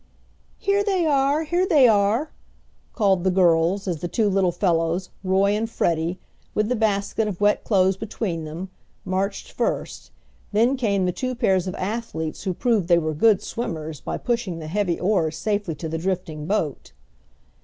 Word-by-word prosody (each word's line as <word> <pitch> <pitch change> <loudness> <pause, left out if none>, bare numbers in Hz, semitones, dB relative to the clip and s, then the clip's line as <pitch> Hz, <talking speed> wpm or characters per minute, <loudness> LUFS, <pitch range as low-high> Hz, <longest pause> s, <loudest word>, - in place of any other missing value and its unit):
"Here 400 0 +1
they 380 -4 +1
are! 285 +1 +2
Here 350 +4 +1
they 290 -8 +6
are!" 220 +7 +2 0.6
called 195 -6 +2
the 190 - +3
girls 180 +1 +2
as 170 -4 -2
the 175 - -2
two 210 +3 +1
little 190 -2 +2
fellows, 175 0 0
Roy 190 +1 +3
and 225 +1 -2
Freddie, 170 -3 0 0.4
with 215 +1 +1
the 250 - +1
basket 215 0 0
of 195 -4 -4
wet 205 0 +2
clothes 190 -2 +2
between 195 -5 -3
them, 165 +5 -7 0.3
marched 195 +2 -2
first; - - -3 0.4
then 235 +6 +3
came 200 -7 0
the 180 - +1
two 255 +7 -3
pairs 190 -7 +1
of 185 - -4
athletes 185 -6 -4
who 185 -2 -1
proved 225 -7 +1
they 175 -1 +5
were 155 -2 -1
good 205 +6 +3
swimmers 160 - -5
by - - -4
pushing 235 -8 -2
the 160 - -7
heavy 180 +1 -1
oars 175 -5 +1
safely 205 -6 -1
to 160 +3 -6
the 160 +1 -3
drifting 165 -4 -3
boat. 170 -8 -2
195 Hz, 170 wpm, -23 LUFS, 170-225 Hz, 0.6 s, they